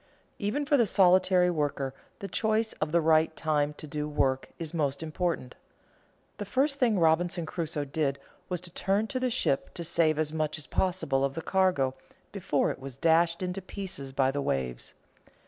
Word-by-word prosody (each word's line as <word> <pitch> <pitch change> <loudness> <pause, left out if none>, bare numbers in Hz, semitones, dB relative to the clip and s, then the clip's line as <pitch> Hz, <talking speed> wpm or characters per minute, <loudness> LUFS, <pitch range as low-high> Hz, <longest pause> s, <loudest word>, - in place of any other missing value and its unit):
_ - - -35 0.4
Even 240 +8 -1
for 285 0 +3
the 235 -4 +3
solitary 185 -1 +4
worker 145 -4 -1 0.3
the 200 - -4
choice 220 +1 0
of 155 0 0
the 170 - +4
right 160 0 +3
time 150 -2 0
to - - -9
do 150 0 -4
work 135 -3 0
is 165 -1 -6
most 145 -2 -1
important. 160 -4 -2 0.9
The - - -2
first 275 +6 +1
thing 230 -5 +3
Robinson 170 +1 +2
Crusoe 160 -2 -3
did 140 -1 -1 0.3
was 180 -1 -2
to 180 -1 -10
turn 195 +4 0
to 255 - -1
the 255 0 0
ship 225 - 0
to 170 - -4
save 165 -2 +2
as 155 0 -1
much 155 -1 -1
as 155 - -6
possible 175 -8 0
of 135 0 -1
the 165 - -4
cargo 185 -9 +2 0.4
before - - 0
it - - -8
was 135 -1 -8
dashed 170 +3 +3
in 180 0 -2
pieces 185 -7 -7
by 135 0 +2
the 145 +1 -2
waves. 65 - -3
165 Hz, 185 wpm, -28 LUFS, 145-185 Hz, 0.9 s, solitary